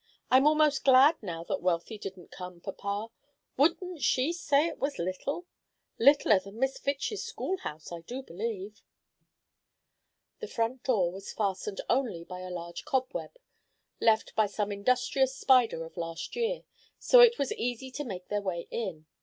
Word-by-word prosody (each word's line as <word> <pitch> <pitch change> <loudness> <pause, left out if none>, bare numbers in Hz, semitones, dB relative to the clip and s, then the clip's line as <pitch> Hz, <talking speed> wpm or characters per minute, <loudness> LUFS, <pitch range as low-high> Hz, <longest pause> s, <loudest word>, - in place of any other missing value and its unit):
"I'm 260 +3 +6
almost 300 -2 +3
glad 275 +4 +6
now 170 -5 -5
that - - -3
Wealthy 180 +4 -1
didn't 190 -3 -8
come, 180 -1 -8
papa. 200 +4 -4 0.4
Wouldn't 340 +3 +1
she 260 +6 +2
say 295 -3 +2
it 335 - -4
was 280 +1 -2
little? 185 - -3 0.5
Littler 270 -5 +6
than 195 +3 -12
Miss 265 +2 0
Fitch's 280 +9 -2
schoolhouse, 160 - -5
I 170 - -5
do 250 +10 -7
believe." 210 +1 -5 1.6
The 445 - -5
front 235 - -2
door 195 -9 +2
was 195 +2 -8
fastened 200 -1 -2
only 235 -10 0
by 180 +1 -8
a 185 0 -7
large 170 -1 -6
cobweb, 260 - -2 0.6
left 220 -1 +2
by 215 -1 +3
some 205 0 -2
industrious 255 +5 +1
spider 245 -11 +3
of 165 - -13
last 165 - -5
year, 480 +1 -1 0.3
so - - +6
it 475 -1 +8
was 280 - -1
easy 245 +2 -3
to 290 +3 -4
make 185 -8 -7
their 205 0 -1
way 180 -4 -3
in. 185 -9 -4
225 Hz, 155 wpm, -29 LUFS, 185-275 Hz, 1.6 s, it